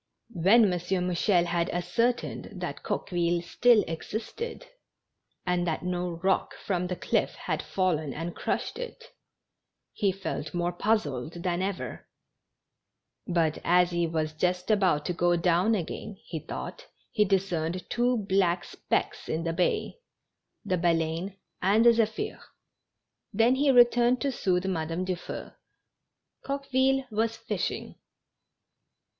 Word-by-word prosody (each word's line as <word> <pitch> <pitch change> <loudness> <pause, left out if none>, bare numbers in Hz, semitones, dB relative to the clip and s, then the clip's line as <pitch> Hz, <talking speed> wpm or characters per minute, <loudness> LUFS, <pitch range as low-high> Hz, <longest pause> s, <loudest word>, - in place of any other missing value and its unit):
When 195 +6 +5
M. 200 - +3 0.3
Mouchel 180 0 +2
had 170 0 0
ascertained 230 +8 -1
that - - -5
Coqueville 175 -1 -1
still 235 +5 +4
existed, 220 - -5 0.8
and 180 -1 +1
that 160 +1 -1
no 180 -1 -2
rock 190 0 +1
from 180 -2 -2
the 180 - -2
cliff - - 0
had - - -2
fallen 160 -6 0
and 165 +5 -5
crushed - - -2
it, - - -8 0.8
he 200 -2 +1
felt 190 -1 -5
more 175 0 0
puz 215 +3 +2
zled 150 +5 -6
than 180 -1 0
ever; 195 0 -4 1.2
but 165 -3 +1
as 180 +1 +4
he 170 -1 +1
was 155 -1 -1
just 180 +5 0
about 185 -8 +3
to 180 - -1
go 175 0 +2
down 180 +5 +3
again, 200 +2 -5
he 160 - -4
thought - - -7 0.2
he 210 - +3
discerned 185 -3 -1
two 245 +1 +1
black 185 -2 +2
specks - - -2
in 160 +1 -1
the 165 -1 -1
bay 180 - 0 0.3
— - - -53
the 185 -1 0
Baleine 170 +3 0 0.2
and 205 +5 +4
the 235 - +9
Zephir, 220 -1 -1 0.9
Then 225 +4 +4
he 280 +2 +2
returned 245 -1 +5
to 280 - +1
soothe 185 -6 0
Madame 165 -1 -2
Dufeu. 180 -2 -5 0.9
Coqueville 270 -1 +1
was 225 +1 0
fishing. - - -2
GENERAL - - -12
HAPPINESS. - - -38
180 Hz, 135 wpm, -28 LUFS, 170-220 Hz, 1.2 s, the